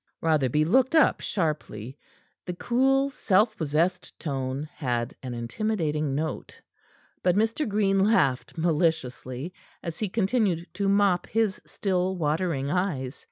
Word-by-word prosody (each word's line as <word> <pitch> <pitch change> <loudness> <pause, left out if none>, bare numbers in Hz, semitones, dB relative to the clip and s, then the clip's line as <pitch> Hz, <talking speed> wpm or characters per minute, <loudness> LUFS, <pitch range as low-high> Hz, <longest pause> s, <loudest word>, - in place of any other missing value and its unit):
Rotherby 150 -2 +2
looked 260 - +3
up 315 - +4
sharply. 145 - -3 0.5
The 180 - -3
cool, 270 +6 +2
self 215 -2 +2
possessed 170 +3 -1
tone 135 -1 -3
had 120 -3 -1
an 125 -2 -5
intimidating 150 - -1
note. 155 +2 -4 0.6
But 180 -1 +2
Mr. 225 +6 +1
Green 200 -1 +2
laughed 180 - +2
maliciously, 160 -3 -1 0.3
as 170 -2 -5
he 215 - -1
continued 195 -4 +1
to 200 -1 0
mop 200 -3 +3
his 220 -3 0
still 190 -2 -1
watering 150 -3 0
eyes. 150 -8 -1
175 Hz, 120 wpm, -26 LUFS, 145-205 Hz, 0.6 s, up